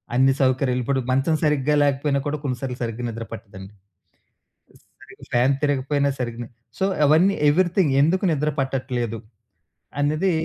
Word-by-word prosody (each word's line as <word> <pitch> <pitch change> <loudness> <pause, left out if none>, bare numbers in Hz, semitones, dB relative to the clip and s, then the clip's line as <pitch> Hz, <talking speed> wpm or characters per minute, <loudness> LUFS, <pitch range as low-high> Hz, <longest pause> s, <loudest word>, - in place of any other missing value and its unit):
అన్ని 135 +2 +4
సౌకర్యాలు 130 -1 +1
ఇప్పుడు 135 +2 0
మంచం 135 +5 +2
సరిగ్గా 150 -1 +2
లేకపోయినా 140 0 +1
కూడా 150 +1 -2
కొన్నిసార్లు 125 -2 -4
సరిగ్గా 115 +1 -4
నిద్ర 115 0 -6
పట్టదండి. 100 -3 -11 1.3
సరిగా - - -16
ఫ్యాన్ 125 +3 +3
తిరగకపోయినా 140 0 +1
సరిగ్గా 120 -1 -4 0.3
సో, - - 0 0.2
అవన్నీ 165 +7 +4
ఎవరీథింగ్ 175 -1 +2
ఎందుకు 180 +6 +1
నిద్ర 150 0 0
పట్టట్లేదు? 125 -4 -2 0.8
అనేది 155 +6 +1
135 Hz, 125 wpm, -22 LUFS, 125-150 Hz, 1.3 s, అన్ని